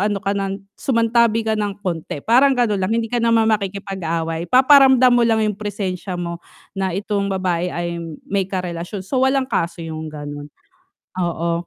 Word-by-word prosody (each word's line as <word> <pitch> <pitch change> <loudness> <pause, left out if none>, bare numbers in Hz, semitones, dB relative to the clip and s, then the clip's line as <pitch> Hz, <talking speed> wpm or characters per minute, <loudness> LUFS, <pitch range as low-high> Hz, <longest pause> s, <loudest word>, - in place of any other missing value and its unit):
ano 205 0 +1
ka 200 - 0
ng 195 0 -3
sumantabi 230 -2 +2
ka 220 - 0
ng 205 -2 -3
konti 165 -4 -3
parang 255 +5 +5
ganun 215 -5 +1
lang 185 - 0
hindi 230 0 0
ka 240 - 0
naman 230 -1 +3
makikipag-away, 190 -5 -2
paparamdam 260 - +6
mo 240 - +4
lang 220 -1 +2
yung 210 - +1
presensya 190 -3 -4
mo 170 0 -5 0.3
na 190 -1 -1
itong 200 0 -1
babae 180 -2 -1
ay 170 0 -4 0.3
may 195 -1 -1
karelasyon, 180 +1 -4
so 255 +6 -1
walang 265 0 +2
kaso 170 -9 -2
yung 160 -1 -6
ganun, 145 -1 -7 0.7
oo 170 0 -1
195 Hz, 165 wpm, -20 LUFS, 170-225 Hz, 0.7 s, paparamdam